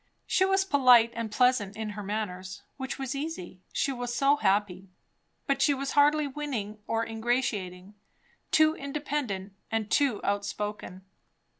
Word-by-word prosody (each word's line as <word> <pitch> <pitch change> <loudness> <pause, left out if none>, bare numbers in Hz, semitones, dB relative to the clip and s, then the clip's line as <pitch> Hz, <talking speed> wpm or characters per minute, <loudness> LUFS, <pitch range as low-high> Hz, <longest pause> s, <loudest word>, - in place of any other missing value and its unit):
She 375 - +2
was 385 0 +2
polite 250 -8 +6
and 230 -2 -4
pleasant 235 -4 +2
in 220 -1 -3
her 210 0 -6
manners, 190 -2 -5
which 265 -1 -4
was 270 -1 -3
easy, 275 - -6
she 275 - 0
was 245 -2 -4
so 275 +4 +3
happy; 195 -3 0 0.6
but 275 -1 0
she 280 +1 +4
was 275 +1 -3
hardly 295 +1 +4
winning 260 -8 -4
or 225 0 0
ingratiating; 220 -5 -2 0.6
too 310 0 +4
independent; 275 -10 -4 0.2
and 220 -1 -2
too 270 -7 +2
outspoken. 205 -2 -3
230 Hz, 140 wpm, -28 LUFS, 205-275 Hz, 0.6 s, polite